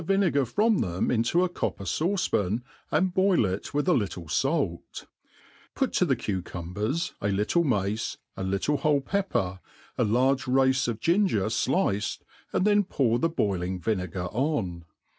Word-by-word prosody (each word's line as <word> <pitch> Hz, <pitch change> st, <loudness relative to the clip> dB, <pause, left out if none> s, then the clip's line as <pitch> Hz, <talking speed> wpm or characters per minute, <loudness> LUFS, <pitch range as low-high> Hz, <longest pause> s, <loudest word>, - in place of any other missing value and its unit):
171 165 Hz, -, -12 dB, 0.2 s
tlwinegar 135 Hz, -4 st, +1 dB
from 215 Hz, 0 st, +3 dB
them 90 Hz, +1 st, -1 dB
into 125 Hz, +10 st, +2 dB
a -, -, +2 dB
copper 175 Hz, -, -3 dB
fauce^pan, 120 Hz, -, 0 dB, 0.3 s
and 185 Hz, -1 st, +1 dB
boil 185 Hz, -, +3 dB
it 95 Hz, +1 st, -3 dB
with 145 Hz, +4 st, -1 dB
a 180 Hz, -, +5 dB
little 100 Hz, -, -2 dB
falc; 135 Hz, -, -1 dB, 0.7 s
pert -, -, 0 dB
to -, -, +3 dB
the -, -, +2 dB
cucumbers 100 Hz, -, -3 dB
a 100 Hz, -, 0 dB
little 105 Hz, -, +1 dB
mace, 105 Hz, -, -1 dB, 0.2 s
^a 95 Hz, -, -5 dB
little 100 Hz, +10 st, 0 dB
whole 145 Hz, 0 st, +2 dB
pepper,^ 135 Hz, -, -1 dB, 0.4 s
a -, -, +4 dB
large 130 Hz, +5 st, +2 dB
race 130 Hz, 0 st, +3 dB
of 115 Hz, -2 st, -2 dB
ginger 170 Hz, -, +2 dB
fliced, 115 Hz, -, 0 dB, 0.3 s
and 185 Hz, -, +1 dB
then 205 Hz, 0 st, +4 dB
poar 125 Hz, -, +1 dB
the 165 Hz, -, +2 dB
boiling 95 Hz, -, -1 dB
vinegar 90 Hz, -2 st, -2 dB
on. 105 Hz, -, -1 dB
120 Hz, 155 wpm, -27 LUFS, -, 0.7 s, a